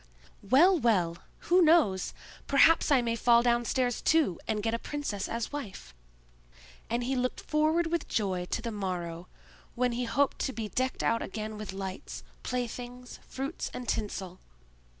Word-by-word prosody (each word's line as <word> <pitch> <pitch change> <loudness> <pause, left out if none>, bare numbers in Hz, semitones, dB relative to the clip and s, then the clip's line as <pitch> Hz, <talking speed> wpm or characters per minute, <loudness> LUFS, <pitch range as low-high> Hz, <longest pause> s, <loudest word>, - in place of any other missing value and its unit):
"Well, 320 - +5
well! 180 - +1 0.3
who 365 +1 +7
knows, 310 - +3 0.3
perhaps 300 +5 +5
I 270 -4 +4
may 230 -1 0
fall 235 0 +4
downstairs 240 +1 +1
too, 310 - +2
and 210 -1 -1
get 225 0 0
a 230 - -1
princess 285 -10 -4
as 230 -1 -3
wife!" 210 - -7 1.0
And 235 +1 0
he 265 +2 -1
looked 255 0 -1
forward 310 +2 +1
with 335 +1 -2
joy 190 -4 -1
to 220 - -3
the 230 - -3
morrow, 180 -4 -4 0.5
when 250 0 +1
he 245 +1 -2
hoped 280 +4 +1
to 265 - -1
be 220 -3 -4
decked 255 +3 -1
out 230 0 +2
again 215 +1 -5
with 210 -2 -6
lights, 190 -1 -6 0.2
play 250 -1 -1
things, 245 +1 -9
fruits, 275 +5 -4
and 250 -1 -6
tinsel. 190 -5 -3
235 Hz, 160 wpm, -29 LUFS, 205-270 Hz, 1.0 s, who